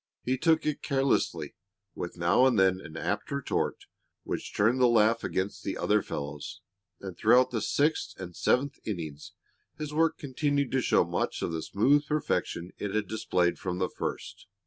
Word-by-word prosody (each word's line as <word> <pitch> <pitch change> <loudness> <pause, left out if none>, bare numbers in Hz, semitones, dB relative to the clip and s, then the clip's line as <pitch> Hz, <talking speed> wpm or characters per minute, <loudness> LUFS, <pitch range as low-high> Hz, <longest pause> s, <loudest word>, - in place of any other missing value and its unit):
He 130 - +1
took 160 +4 +2
it 150 -1 -1
carelessly, 135 - 0 0.4
with 85 0 -6
now 90 +10 +4
and 125 -4 +2
then 95 -1 +3
an 80 -3 -9
apt 105 +5 -2
retort 140 -1 -2 0.4
which - - -4
turned 115 +5 +3
the 125 - +7
laugh 115 0 +3
against 95 +2 -2
the 95 - -3
other 105 0 +2
fellows, 70 -3 -6 0.4
and 95 -2 -7
throughout 120 +7 +4
the 115 -3 -1
sixth 150 -6 0
and 90 -2 -7
seventh 140 +3 +1
innings 80 -8 -6 0.4
his 150 -1 -5
work 165 +1 +2
continued 140 0 -1
to 130 - +2
show - - +3
much - - -2
of - - -1
the 80 -1 -3
smooth 140 - +2
perfection 120 - -1
it 105 0 -3
had 110 -1 0
displayed 90 -5 0
from 90 -1 -3
the 90 0 0
first. - - -6
110 Hz, 170 wpm, -29 LUFS, 90-140 Hz, 0.4 s, the